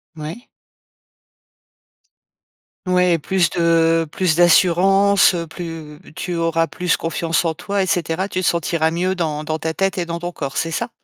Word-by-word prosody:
Mouais. 160 Hz, -, -8 dB, 2.4 s
Ouais, 180 Hz, -1 st, +3 dB
plus 175 Hz, +3 st, 0 dB
de 165 Hz, -1 st, +2 dB
plus 180 Hz, -2 st, 0 dB
d'assurance, 190 Hz, +4 st, +4 dB
heu, 170 Hz, -1 st, -3 dB
plus 160 Hz, -3 st, -8 dB, 0.2 s
tu 180 Hz, -2 st, -4 dB
auras 165 Hz, 0 st, 0 dB
plus 180 Hz, 0 st, -1 dB
confiance 165 Hz, 0 st, -1 dB
en 165 Hz, -2 st, -1 dB
toi 200 Hz, +4 st, -2 dB
et 185 Hz, -, -1 dB
cetera, 175 Hz, +1 st, -1 dB
tu 185 Hz, -, -2 dB
te -, -, -2 dB
sentiras 165 Hz, -1 st, +1 dB
mieux 185 Hz, +3 st, -1 dB
dans 155 Hz, -4 st, -2 dB
dans 155 Hz, +1 st, -2 dB
ta 160 Hz, 0 st, -3 dB
tête 195 Hz, +3 st, -1 dB
et 175 Hz, -, -1 dB
dans 170 Hz, 0 st, -5 dB
ton 175 Hz, +1 st, -5 dB
corps, 140 Hz, -5 st, -6 dB
c'est 165 Hz, -, -1 dB
ça? 230 Hz, +9 st, -3 dB
170 Hz, 165 wpm, -19 LUFS, 165-185 Hz, 2.4 s, d'assurance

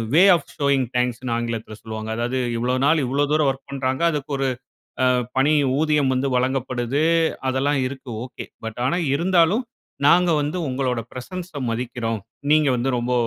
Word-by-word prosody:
"Way 175 Hz, -, +7 dB
of 155 Hz, -, -5 dB
showing 140 Hz, -2 st, +2 dB
தேங்க்ஸ்ன்னு" 125 Hz, 0 st, -1 dB
ஆங்கிலத்துல 115 Hz, -2 st, -4 dB
சொல்லுவாங்க. 110 Hz, 0 st, -6 dB
அதாவது 120 Hz, +2 st, -1 dB, 0.2 s
இவ்ளோ 125 Hz, +2 st, 0 dB
நாள் 160 Hz, +1 st, +4 dB
இவ்ளோ 140 Hz, +3 st, +1 dB
தூரம் 150 Hz, -2 st, +3 dB
ஒர்க் 135 Hz, +1 st, -12 dB
பண்றாங்க. 130 Hz, 0 st, -2 dB
அதுக்கு 145 Hz, -1 st, -4 dB
ஒரு 135 Hz, -, +1 dB, 0.6 s
அ -, -, +4 dB, 0.3 s
பணி 140 Hz, +3 st, +4 dB, 0.3 s
ஊதியம் 150 Hz, -4 st, +2 dB
வந்து 130 Hz, +2 st, 0 dB
வழங்கப்படுது. 130 Hz, +1 st, 0 dB, 0.5 s
அதெல்லாம் 135 Hz, +2 st, +1 dB
இருக்கு 130 Hz, -2 st, -9 dB
ஓகே. 130 Hz, -, -8 dB, 0.2 s
பட் 110 Hz, 0 st, -6 dB
ஆனா 135 Hz, +7 st, +1 dB, 0.2 s
இருந்தாலும், 180 Hz, -, +3 dB, 0.4 s
"நாங்க 175 Hz, +3 st, +5 dB
வந்து 150 Hz, +5 st, -2 dB
உங்களோட 130 Hz, -2 st, -1 dB
பிரசன்ஸ 180 Hz, +8 st, -7 dB, 0.2 s
மதிக்கிறோம். 115 Hz, -2 st, -3 dB, 0.3 s
நீங்க 150 Hz, -1 st, +5 dB
வந்து 125 Hz, +3 st, 0 dB
ரொம்ப 120 Hz, +1 st, -2 dB
130 Hz, 155 wpm, -22 LUFS, 125-150 Hz, 0.6 s, Way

